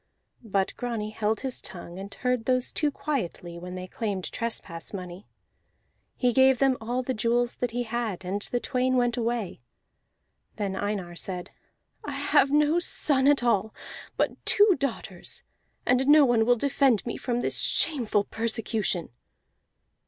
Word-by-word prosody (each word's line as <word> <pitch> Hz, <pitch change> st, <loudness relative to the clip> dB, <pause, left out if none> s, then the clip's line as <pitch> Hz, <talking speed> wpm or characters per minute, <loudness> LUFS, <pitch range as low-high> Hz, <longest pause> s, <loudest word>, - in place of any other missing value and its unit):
But 195 Hz, -3 st, 0 dB
Grani 230 Hz, -4 st, -3 dB
held 215 Hz, 0 st, -1 dB
his 265 Hz, -2 st, -4 dB
tongue 175 Hz, 0 st, -5 dB
and 200 Hz, +1 st, -7 dB
heard 250 Hz, +1 st, -1 dB
those 255 Hz, -1 st, +2 dB
two 300 Hz, -, +1 dB
quietly 180 Hz, -, -4 dB
when 180 Hz, +1 st, -7 dB
they 185 Hz, 0 st, -5 dB
claimed 195 Hz, -1 st, -3 dB
trespass 195 Hz, -8 st, -5 dB
money; 185 Hz, 0 st, -7 dB, 0.9 s
he 250 Hz, -2 st, +2 dB
gave 265 Hz, 0 st, +5 dB
them 270 Hz, 0 st, +3 dB
all 245 Hz, +3 st, -2 dB
the 260 Hz, -, -2 dB
jewels 235 Hz, +2 st, +1 dB
that 245 Hz, -, -1 dB
he 245 Hz, +2 st, -2 dB
had, 225 Hz, -5 st, -3 dB
and 195 Hz, +3 st, -2 dB
the 245 Hz, -, -1 dB
twain 255 Hz, 0 st, 0 dB
went 245 Hz, -1 st, +2 dB
away. 230 Hz, -, -2 dB, 0.9 s
Then 200 Hz, -3 st, -2 dB
Einar 190 Hz, -3 st, -3 dB
cried, 180 Hz, 0 st, -5 dB, 0.5 s
"I -, -, -5 dB
have 275 Hz, -, +3 dB
no 300 Hz, +3 st, +3 dB
son 280 Hz, -5 st, +2 dB
at 285 Hz, -3 st, +4 dB
all, 220 Hz, -3 st, +1 dB, 0.4 s
but -, -, -1 dB
two 410 Hz, -2 st, +5 dB
daughters; 275 Hz, -4 st, -4 dB, 0.4 s
and 255 Hz, +2 st, +2 dB
no 295 Hz, 0 st, +8 dB
one 235 Hz, -3 st, +3 dB
will 245 Hz, -, +6 dB
defend 270 Hz, -3 st, +2 dB
me 235 Hz, -, -3 dB
from 245 Hz, -1 st, -2 dB
this -, -, 0 dB
shameful 235 Hz, -10 st, +2 dB
persecution." 220 Hz, -5 st, -1 dB
235 Hz, 150 wpm, -27 LUFS, 200-255 Hz, 0.9 s, no